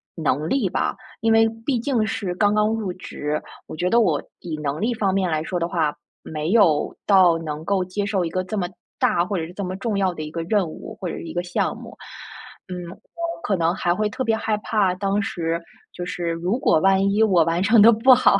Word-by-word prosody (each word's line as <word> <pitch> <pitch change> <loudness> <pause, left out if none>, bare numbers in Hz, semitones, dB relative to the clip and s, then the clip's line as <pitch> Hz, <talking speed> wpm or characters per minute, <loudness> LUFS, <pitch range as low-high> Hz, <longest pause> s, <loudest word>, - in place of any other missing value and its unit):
能 155 -2 0
力 250 -9 +1
吧， - - -1 0.3
因 225 0 +2
为 225 0 +5 0.2
毕 260 -5 +1
竟 235 -4 0
是 200 -4 -3
刚 205 +2 +3
刚 210 0 +3
入 215 -4 -2
职， 150 -4 -4 0.3
我 - - -7
觉 180 +3 0
得 235 - +4
我 165 -9 +2 0.2
以 160 -3 -5
能 145 +1 -2
力 240 +2 +1
方 200 -4 0
面 190 -2 +1
来 155 0 0
说 180 +1 -2
的 170 - 0
话， 160 -4 0 0.3
没 155 +1 -4
有 190 -10 +3
到 185 -4 +5
能 155 -1 -5
够 195 -1 +1
接 200 +3 -3
受 195 -3 0
一 165 - -2
个 185 +2 -2
这 210 +4 -4
么 180 -3 0 0.3
大 170 - +2
或 200 -1 -2
者 160 - -2
是 175 - -12
这 200 - -5
么 185 0 -3
重 210 0 -2
要 190 -2 +1
的 155 - -7
一 150 - -6
个 165 0 -3
任 195 -1 +1
务， 155 - -9
或 185 - -4
者 - - -4
是 - - -7
一 165 - -7
个 175 - -1
项 175 - -1
目。 - - -11 0.7
嗯， 180 - -4 0.7
可 195 - 0
能 170 +1 +1
还 175 -2 +1
会 215 +3 0
特 260 +5 -3
别 225 - +1
害 220 -1 -1
怕， 210 -3 +1
当 200 +2 0
时 170 -3 -2 0.3
就 175 - -5
是 175 -1 -3
如 175 +7 -1
果 160 - +3
万 195 +2 +3
一 210 - +2
我 185 -7 +5
完 165 +2 0
成 220 +2 +5
得 230 - +9
不 235 +4 +6
好， 200 -5 +4
185 Hz, 260 characters per minute, -23 LUFS, 170-210 Hz, 0.7 s, 得